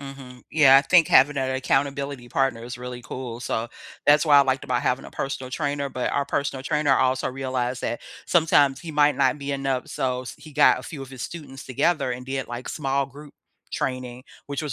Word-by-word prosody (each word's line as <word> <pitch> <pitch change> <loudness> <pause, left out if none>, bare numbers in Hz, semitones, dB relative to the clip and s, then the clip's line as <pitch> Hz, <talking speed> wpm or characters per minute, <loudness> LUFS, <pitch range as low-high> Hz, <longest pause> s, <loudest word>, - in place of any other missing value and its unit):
Mhm. 135 -3 -10
Yeah, 135 -4 +7
I - - +1
think 165 +3 +4
having 140 +2 +5
an 130 -1 0
accountability 135 -1 -1
partner 130 -3 0
is 120 +1 -7
really 125 0 -7
cool, 120 0 -6
so, 120 -1 -3 0.4
that's 150 +2 +6
why 145 -2 +6
I - - +8
liked 130 -1 -1
about 125 - 0
having 125 +1 -1
a - - -10
personal 135 -2 -4
trainer, 140 0 -2
but 125 - -2
our 140 - 0
personal 140 -1 -2
trainer 150 -1 +2
also 130 0 +1
realized 130 -1 -3
that 120 - -2 0.2
sometimes 145 -5 +3
he 170 - -7
might 150 -1 +3
not 150 - +2
be 140 0 -4
enough. 135 -2 -2
So, 125 -1 -2
s 130 - -8
he 155 - -13
got 145 +1 +5
a - - -9
few 145 -4 -8
of 135 - -10
his 130 -2 -10
students 145 -5 -8
together 140 +2 0
and 125 +1 -7
did, 135 -1 -4
like, 120 +1 -6
small 140 -2 -1
group 145 +2 -13 0.4
training, 130 0 -4 0.2
which 140 +2 -4
was 150 - -3
135 Hz, 210 wpm, -24 LUFS, 130-145 Hz, 0.4 s, I